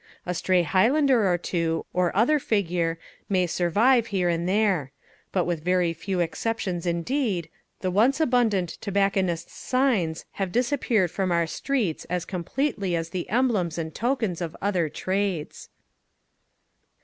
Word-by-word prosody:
A 180 - -1
stray 180 0 +2
highlander 230 - +3
or 175 - +2
two, 165 -2 -1
or 180 -1 +2
other 295 +8 +4
figure, 175 -8 0 0.3
may 185 -2 +2
survive 215 +9 +3
here 185 -4 0
and 170 +1 0
there; 190 -9 +1 0.4
but 180 -3 +1
with 170 -3 -2
very 180 -1 +2
few 180 +3 -3
exceptions 180 +1 -2
indeed, 175 - -1 0.3
the 185 - -1
once 235 - +3
abundant 230 - +1
tobacconists' 195 -4 0
signs 230 -12 0 0.2
have 190 -2 -1
disappeared 235 - +1
from 190 -1 -1
our 170 -1 +2
streets 205 - -2
as 180 0 -2
completely 195 - -2
as 165 0 -2
the 180 -2 -4
emblems 210 -9 +1
and 160 -1 -4
tokens 225 -8 -1
of 165 -2 -4
other 185 -5 0
trades. 185 -2 -3
185 Hz, 135 wpm, -25 LUFS, 170-225 Hz, 0.4 s, other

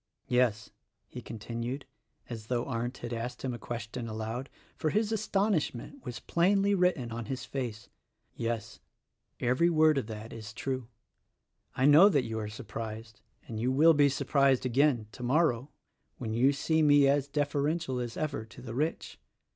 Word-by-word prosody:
"Yes," 120 -4 +1 0.4
he - - -8
continued, 115 +4 -5 0.4
as 110 -3 -7
though 120 -1 0
Arndt 120 0 -3
had 120 0 -6
asked 120 +2 -5
him 130 -2 -2
a 120 - -6
question 115 +1 -5
aloud; 110 +4 -4 0.3
for 155 - -1
his 215 +5 +1
astonishment 200 - -1
was 120 -2 -6
plainly 195 +4 +2
written 180 -11 +1
on 115 0 -4
his 130 +3 -4
face; 120 -5 -5 0.5
"yes: 115 -2 -3 0.6
every 130 +8 +3
word 155 -3 +4
of 120 - -5
that 110 0 -7
is 110 -2 -8
true. 130 -1 -3 0.9
I 130 - +2
know 155 +8 +8
that 140 -10 +2
you 110 -1 -3
are 105 -1 -4
surprised; 110 -1 -7 0.3
and 110 -2 -5
you 125 +3 +1
will 155 +5 +6
be 145 -1 +5
surprised 135 -1 +2
again, 130 -2 +2
tomor 140 +8 +2
row, 125 +4 -5 0.5
when 110 -3 -4
you 125 +5 +4
see 160 +3 +1
me 145 -2 +6
as 140 0 +2
deferential 145 0 -1
as 120 -1 -4
ever 155 -8 -2
to 110 +2 -14
the 115 -2 -6
rich. 150 +6 -2
125 Hz, 165 wpm, -30 LUFS, 115-150 Hz, 0.9 s, know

